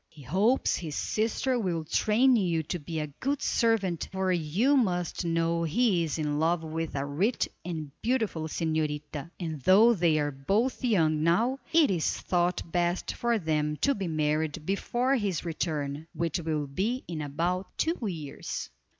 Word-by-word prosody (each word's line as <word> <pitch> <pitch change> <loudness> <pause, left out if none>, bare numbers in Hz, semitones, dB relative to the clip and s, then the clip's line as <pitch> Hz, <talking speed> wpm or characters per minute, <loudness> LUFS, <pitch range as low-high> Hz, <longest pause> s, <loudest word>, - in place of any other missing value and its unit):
"He 150 -3 -15
hopes 195 - +2
his 155 -4 -5
sister 230 +4 0
will 170 -6 -1
train 230 +10 +3
you 175 -7 +1
to 175 +3 -4
be 160 +2 -4
a 150 - -1
good 280 +1 0
servant 205 -8 +1
for 190 -1 0
you 180 - +2
must 180 - 0
know 165 0 +1
he 175 +2 +2
is 160 -1 -2
in 150 -1 -1
love 165 +1 +1
with 160 0 -4
a 140 0 -1
rich 180 - 0 0.2
and 160 -4 -5
beautiful 220 -10 0
señorita, 155 -2 -2
and 160 -5 -4
though 210 - +6
they 170 -6 +2
are 145 -1 0
both 200 - 0
young 160 -10 +2
now, 225 - +2
it 325 -7 +5
is 170 -4 0
thought 175 0 0
best 175 0 0
for 235 -1 +1
them 150 -4 0
to 280 - +2
be 195 -7 -3
married 155 0 -1
before 240 +8 +1
his 195 -7 -2
return, 155 -2 -3
which 165 +1 -1
will 155 -3 -1
be 205 - -2
in 165 -3 -4
about 170 +6 -1
two 330 +2 0
years." 155 -7 -5
170 Hz, 165 wpm, -28 LUFS, 155-210 Hz, 0.2 s, though